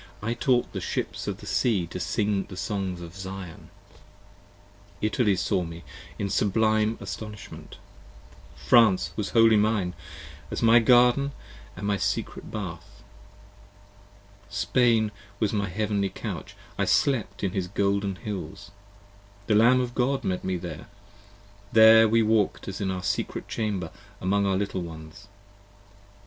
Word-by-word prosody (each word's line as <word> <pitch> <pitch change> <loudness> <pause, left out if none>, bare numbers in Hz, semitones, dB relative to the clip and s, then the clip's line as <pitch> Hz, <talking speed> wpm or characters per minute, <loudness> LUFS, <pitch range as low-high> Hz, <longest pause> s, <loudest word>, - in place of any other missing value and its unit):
I 115 +2 0
taught 120 0 +1
the - - -4
ships - - -3
of - - -4
the - - -10
sea 105 -8 +1
to 85 - -7
sing 100 +2 0
the 95 - -10
songs 95 -4 -3
of 85 0 -10
Zion. 95 -3 -8 1.3
Italy 105 -1 +1
saw 95 +1 0
me, 85 0 -8 0.3
in 100 - -2
sublime 110 +2 +1
astonishment: 105 0 -8 0.8
France 110 -6 +4
was 105 -2 -3
wholly 115 -1 +5
mine, 105 -4 +1 0.5
40 - - -20
As - - -4
my 115 +1 +7
garden 125 +4 +4 0.2
& - - -20
as 95 - -8
my 100 0 +1
secret - - -3
bath: - - -7 1.5
Spain 115 -4 +2 0.3
was 110 -1 0
my 100 -2 -1
heavenly 100 0 -1
couch, - - -7 0.2
I - - +2
slept 115 -8 +1
in 95 - 0
his 95 -1 -2
golden 100 +1 0
hills; 100 +1 -7 0.7
the 110 - +1
Lamb 120 +4 +5
of 125 -1 -2
God 130 +2 0
met 90 -1 -2
me 95 -1 -1
there, 85 -3 -8 0.8
There 110 0 +8
we 115 +1 +3
walked 110 -2 +1
as 95 +1 -5
in 95 - -1
our 90 -1 -3
secret 100 - -2
chamber 100 -7 -3 0.3
among 100 +2 +1
our 95 -1 +1
little 100 -2 -2
ones. 80 +4 -10
100 Hz, 140 wpm, -26 LUFS, 95-110 Hz, 1.5 s, There